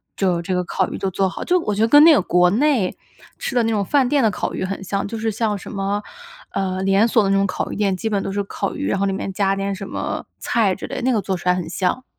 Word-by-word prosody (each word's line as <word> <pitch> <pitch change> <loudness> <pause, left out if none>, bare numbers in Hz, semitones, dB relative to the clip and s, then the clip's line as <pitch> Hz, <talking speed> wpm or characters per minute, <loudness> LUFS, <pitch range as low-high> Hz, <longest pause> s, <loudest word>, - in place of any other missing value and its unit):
就 180 -3 +1
这 180 +2 -2
个 180 - 0
烤 190 +1 -1
鱼 - - -5
就 195 - -2
做 190 +1 +1
好 - - -6
就 365 0 +2
我 210 -9 -2
觉 210 - -1
得 225 - +4
跟 290 +5 +7
那 330 - +9
个 220 - +4
国 180 0 +3
内 245 -4 +1 0.4
吃 270 - -4
的 240 - +3
那 225 - 0
种 210 -2 +1
饭 275 +3 +2
店 285 -2 +2
的 220 - +3
烤 - - -3
鱼 - - -3
很 195 +1 -4
像， 195 +1 -2
就 225 - -5
是 225 +1 -1
像 215 -1 -1
什 - - -9
么， 200 +1 -2 0.5
呃， 190 -1 -2
连 195 +3 +4
锁 225 -2 +3
的 195 - 0
那 - - +3
种 195 0 +3
烤 - - -3
鱼 - - -4
店 200 -3 0
基 225 - -3
本 200 -2 -1
都 195 - -3
是 205 - -1
烤 195 - -4
鱼， 285 - -3
然 195 - 0
后 200 - +1
里 - - 0
面 195 0 -4
加 195 0 +1
点 195 0 -2
什 195 +1 -7
么 - - -4
菜 220 -5 +1
之 - - -7
类 - - -5
的， - - -3
那 260 - +2
个 225 - +2
做 190 -1 -2
出 180 - -2
来 180 - +4
很 180 -3 -4
像。 185 +8 -1
200 Hz, 330 characters per minute, -21 LUFS, 190-225 Hz, 0.5 s, 那